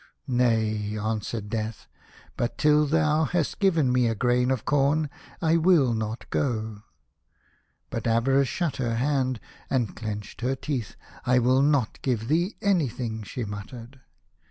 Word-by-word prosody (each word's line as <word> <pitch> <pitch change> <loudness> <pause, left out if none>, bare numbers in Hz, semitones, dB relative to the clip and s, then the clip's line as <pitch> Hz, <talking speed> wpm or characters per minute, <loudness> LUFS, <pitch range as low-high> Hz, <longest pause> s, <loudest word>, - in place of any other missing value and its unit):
"Nay," 110 -5 +1
answered 110 0 -3
Death, 110 0 -4 0.5
"but 120 - -2
till 150 0 +4
thou 155 +1 +2
hast 165 0 -1
given 165 -10 +3
me 125 -1 +3
a 115 - 0
grain 125 +2 +2
of 130 -4 -1
corn 145 +1 +2 0.3
I 165 +1 +4
will 160 -7 +4
not 110 +1 -4
go." 110 -5 -1 1.1
But - - -3
Avarice 135 +4 +3
shut 170 0 -2
her 120 -3 -1
hand, 130 -1 0 0.3
and 120 -6 0
clenched 105 0 -6
her 130 +2 0
teeth. 130 -5 -4 0.2
" - - -20
I 125 +1 +4
will 130 +2 +4
not 140 -5 +1
give 120 -3 -1
thee 175 +7 +1
anything," 125 - 0
she 115 +4 -5
muttered. 115 +5 -8
125 Hz, 145 wpm, -26 LUFS, 110-145 Hz, 1.1 s, till